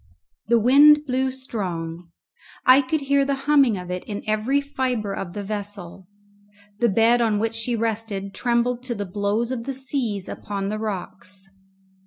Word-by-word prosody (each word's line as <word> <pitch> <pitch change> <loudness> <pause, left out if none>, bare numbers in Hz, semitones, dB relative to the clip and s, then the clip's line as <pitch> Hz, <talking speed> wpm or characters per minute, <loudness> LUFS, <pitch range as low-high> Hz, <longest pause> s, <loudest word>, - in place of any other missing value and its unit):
The 235 - +4
wind 290 +6 +6
blew 260 0 0
strong. 180 -10 -5 0.6
I 260 +2 +7
could 290 +3 -1
hear 280 0 +2
the 275 0 0
humming 280 -7 +4
of 180 0 -7
it 180 0 -4
in 205 -1 -5
every 215 +6 +1
fibre 255 -7 -2
of 175 -3 -5
the 205 0 -5
vessel. 200 -3 -5 0.7
The 235 - +3
bed 230 +4 +4
on 220 -3 +2
which 225 +2 -1
she 225 +1 -2
rested 215 -3 -3
trembled 240 0 0
to 245 -2 -3
the 205 - -4
blows 205 +5 -1
of 235 -3 -4
the 275 - -3
seas 250 -7 -3
upon 200 -1 -4
the 215 +1 -3
rocks. 195 -2 -6
225 Hz, 165 wpm, -23 LUFS, 200-260 Hz, 0.7 s, I